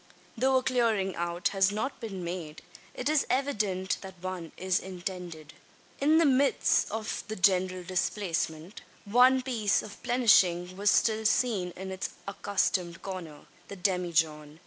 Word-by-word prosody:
Though 265 +3 +2
a 255 - 0
clearing 225 -7 +1
out 170 +1 -1
has 195 0 +2
not 220 +7 -3
been 195 -6 -6
made, 170 -3 -6 0.3
it 250 - -3
is 305 -1 +2
evident 210 -9 0
that 190 -2 -10
one 185 -2 -6
is 185 -1 +1
intended. 180 -4 -7 0.5
In 305 +3 +4
the 330 - +5
midst 275 0 +3
of 220 0 -4
the 215 - -4
general 185 -1 +2
displacement, 175 -2 -2 0.2
one 250 +5 +5
piece 225 -6 +1
of 210 - -11
plenishing 185 -7 +3
was 200 +2 +2
still 220 +1 +2
seen 220 -4 +1
in 190 +1 -6
its 190 0 -4 0.2
accustomed 190 -3 -1
corner 180 -6 -7 0.3
the 200 - -8
demijohn. 165 -5 0
190 Hz, 145 wpm, -29 LUFS, 180-220 Hz, 0.5 s, the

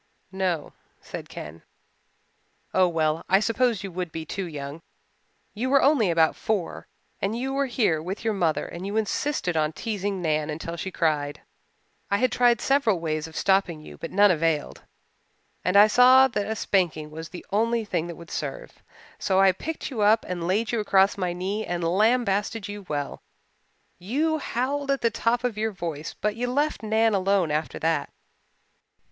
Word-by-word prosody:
"No," 185 -5 -2 0.3
said - - -8
Ken. 75 +2 -9 1.1
"Oh 185 -1 +4
well, 160 -2 0
I 190 - +5
suppose 230 -1 +1
you 195 - -5
would 180 -1 -4
be 160 0 -5
too 190 +4 -4
young 145 0 -7 0.7
you 240 +5 -2
were 275 0 +4
only 270 -8 +4
about 165 -1 +3
four 210 -6 -3 0.3
and 205 +4 -1
you 265 +2 -2
were 275 0 0
here 210 -11 +1
with 185 +7 -5
your 220 - +2
mother 170 -6 0
and 170 - -8
you 205 +2 -2
insisted 220 - -1
on 155 0 +1
teasing 205 -2 -3
Nan 155 -3 0
until 160 +2 -5
she 170 +3 -4
cried. 150 -5 -1 0.7
I 200 - +2
had 255 +3 +1
tried 240 -2 +3
several 270 -9 +2
ways 155 -1 -2
of 160 - -14
stopping 190 -4 +2
you 155 - -11
but 165 - -5
none 205 +1 +5
availed, 160 -3 -1 0.8
and 185 +3 +2
I 205 - +10
saw 255 +4 +7
that 205 -4 -2
a 220 - -2
spanking 170 -7 0
was 160 +1 -7
the 175 - -9
only 230 +2 +1
thing 175 -4 -2
that 170 - -7
would 170 0 -12
serve. - - -6 0.4
So 190 -1 +1
I 195 0 +6
picked 310 - -5
you 230 -5 -3
up 215 +2 +4
and 175 -2 -3
laid 210 +5 +1
you 235 - 0
across 195 -2 +3
my 180 -3 -1
knee 190 +5 -3
and 175 -3 -3
lambasted 210 +3 +1
you 205 -2 -8
well. 145 -1 -3 0.8
You 305 - 0
howled 275 +3 -2
at 275 -1 +1
the 230 - +2
top 230 +2 0
of 235 -4 -2
your 220 +1 0
voice 165 -5 -5
but 210 0 -2
you 245 +2 -2
left 295 +4 0
Nan 220 0 +2
alone 195 -4 +2
after 155 +1 -2
that." 160 -3 0
195 Hz, 180 wpm, -25 LUFS, 165-225 Hz, 1.1 s, I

